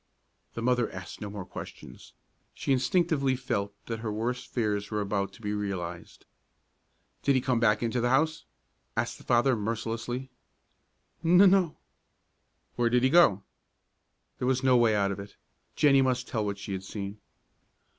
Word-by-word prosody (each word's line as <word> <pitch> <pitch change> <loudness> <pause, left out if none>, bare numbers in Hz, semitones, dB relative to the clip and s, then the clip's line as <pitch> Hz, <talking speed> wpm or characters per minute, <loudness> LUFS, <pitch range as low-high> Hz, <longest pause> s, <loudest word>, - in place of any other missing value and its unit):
The 115 - -4
mother 125 -1 +1
asked 95 -1 -9
no 105 - -4
more 100 -2 -6
questions. - - -10 0.4
She 135 - 0
instinctively 140 0 +2
felt 100 -6 -3
that 115 -1 -4
her 110 -1 -3
worst 120 +4 -3
fears 105 -4 -1
were 105 - -2
about 100 -1 -1
to 115 - -16
be 105 0 -2
realized. 90 -5 -5 1.0
"Did 140 - +2
he - - +4
come 125 -1 0
back 110 -1 +3
into 120 +1 0
the 120 - +1
house?" 155 +5 +1 0.5
asked - - -1
the - - -14
father, 120 +2 +3
mercilessly. 115 +4 -3 0.9
"N 170 +2 +5
no." 190 -3 +5 1.0
"Where 120 -1 +2
did 125 +1 +2
he 130 - +3
go?" 125 - +5 1.0
There 125 - -1
was 130 0 +1
no 130 -1 +5
way 115 -3 +4
out 100 -1 +1
of 100 - -5
it. 100 +1 -10 0.4
Jennie 140 -2 +5
must 125 -1 0
tell 110 -3 -1
what 100 -1 -2
she 100 - -7
had 95 -1 -4
seen. 100 +1 -6
115 Hz, 165 wpm, -28 LUFS, 105-130 Hz, 1.0 s, N